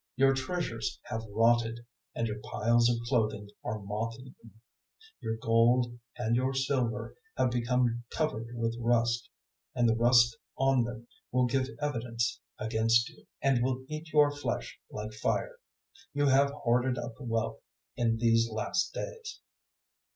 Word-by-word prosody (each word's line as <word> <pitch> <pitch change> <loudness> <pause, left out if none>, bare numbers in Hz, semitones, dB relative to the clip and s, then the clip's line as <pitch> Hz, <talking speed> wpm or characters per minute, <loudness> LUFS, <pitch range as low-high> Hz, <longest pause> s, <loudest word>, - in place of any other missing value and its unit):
005:002 135 - +6
Your 135 - +5
treasures 135 -4 -3
have 110 - -4
rotted, 115 +2 +2 0.3
and 115 - 0
your 105 -1 -3
piles 115 +2 +3
of 120 - +2
clothing 110 -4 0 0.2
are 110 - -2
moth 105 +3 -3
eaten; 130 0 -12
005:003 110 - -15 0.7
your 110 0 -3
gold 120 +1 +3 0.2
and 115 -1 +1
your 130 +2 +1
silver 130 -3 -1 0.2
have 125 - +2
become 120 -1 +1
covered 135 -8 -1
with 115 0 -1
rust, 120 0 +1 0.5
and 120 -1 +3
the 115 - +3
rust 120 0 +5 0.2
on 135 -3 +3
them 120 0 -7 0.2
will 125 0 +3
give 130 +1 +1
evidence 120 -5 -1 0.2
against 115 +3 +2
you, - - -19 0.2
and 135 -3 +3
will 130 0 -1
eat 155 +1 -6
your 150 -1 +5
flesh 145 - -4
like 105 +1 -6
fire. - - -1 0.6
You 145 0 +2
have 140 +1 +5
hoarded 125 -2 +1
up 120 -1 -4
wealth 115 -3 -2 0.4
in 115 -1 +1
these 115 0 +3
last 110 - -1
days. 455 -2 -6
120 Hz, 150 wpm, -30 LUFS, 115-130 Hz, 0.7 s, 005:002